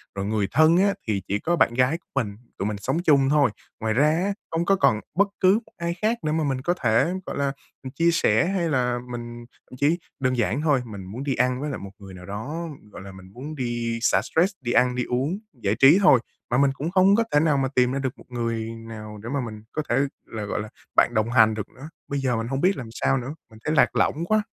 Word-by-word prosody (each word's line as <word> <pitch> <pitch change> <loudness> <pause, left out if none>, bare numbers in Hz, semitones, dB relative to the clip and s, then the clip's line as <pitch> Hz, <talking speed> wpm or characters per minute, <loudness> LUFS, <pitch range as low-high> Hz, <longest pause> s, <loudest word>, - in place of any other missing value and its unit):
Rồi 100 0 -3
người 105 -2 0
thân 155 +5 +5
á 200 +1 +3
thì 100 -3 0
chỉ 100 +1 -1
có 175 +1 0
bạn 120 - +3
gái 130 +6 +2
của 175 - -35
mình, 105 -7 -1 0.2
tụi 100 - -1
mình 105 -1 -3
sống 135 +11 -1
chung 140 -4 +4
thôi. 145 -6 +3 0.3
Ngoài 110 -1 0
ra 145 +5 +4
á, 185 +5 0 0.2
hông 165 +1 0
có 195 - +4
còn 140 - +3 0.2
bất 200 +2 +4
cứ 185 +1 +5
một - - -23
ai 170 0 -2
khác 225 +2 +1
để 155 - 0
mà 160 0 0
mình 135 -2 -1
có 175 +5 +1
thể, 135 +11 +3
gọi - - -5
là, 140 -1 0 0.3
ừm, 130 - -6
chia 170 +2 +3
sẻ 115 -8 +3
hay 180 -4 0
là 125 -3 +1
mình 120 0 -7 0.2
thậm 125 - -11
chí 150 +5 +2 0.2
đơn 130 -1 0
giản 120 +5 0
thôi, 145 -5 +2
mình 100 -4 -8
muốn 115 +8 -6
đi 135 -2 -1
ăn 125 +2 +1
với 150 - -2
lại - - -4
một 100 0 -9
người 95 -1 -11
nào 90 0 -11
đó, 145 +12 -5 0.2
gọi - - -10
là, 95 0 -9
mình 95 0 -14
muốn 145 +5 -7
đi 120 -3 -2
xả 95 -4 +3
stress, 175 - +1
đi 120 -1 -2
ăn, 125 0 +3
đi 125 - 0
uống, 135 +10 -1 0.2
giải 110 -5 -1
trí 140 +7 +8
thôi 140 -10 +6 0.3
mà 120 - +3
mình 140 -1 +4
cũng 155 +5 -4
không 195 +1 +5
có 230 - +3
thể 145 - +4
nào 150 -3 +2
mà 135 - +1
tìm 125 0 +3
ra 135 - -1
được 130 -2 -3
một - - -16
người 115 -2 -2 0.2
nào 110 -1 -8
để 120 - -5
mà 140 - 0
mình 110 -1 -8
có 155 - -2
thể 120 - +2 0.3
là, 110 -2 -6
gọi 105 - -2
là, 105 - -7 0.3
bạn 120 - +4
đồng 110 +1 +1
hành 110 -3 +5
được 105 -2 -5
nữa. 145 +5 -11 0.2
Bây 140 0 -2
giờ 130 -3 0
mình 115 +1 -3
hông 135 +2 -2
biết 190 0 +3
làm 120 -4 -6
sao 135 - +1
nữa, 130 +4 -5
mình 110 0 -16
thấy 155 - 0
lạc - - +4
lõng 165 +3 +1
quá! 215 +2 +2
130 Hz, 265 wpm, -24 LUFS, 115-155 Hz, 0.3 s, trí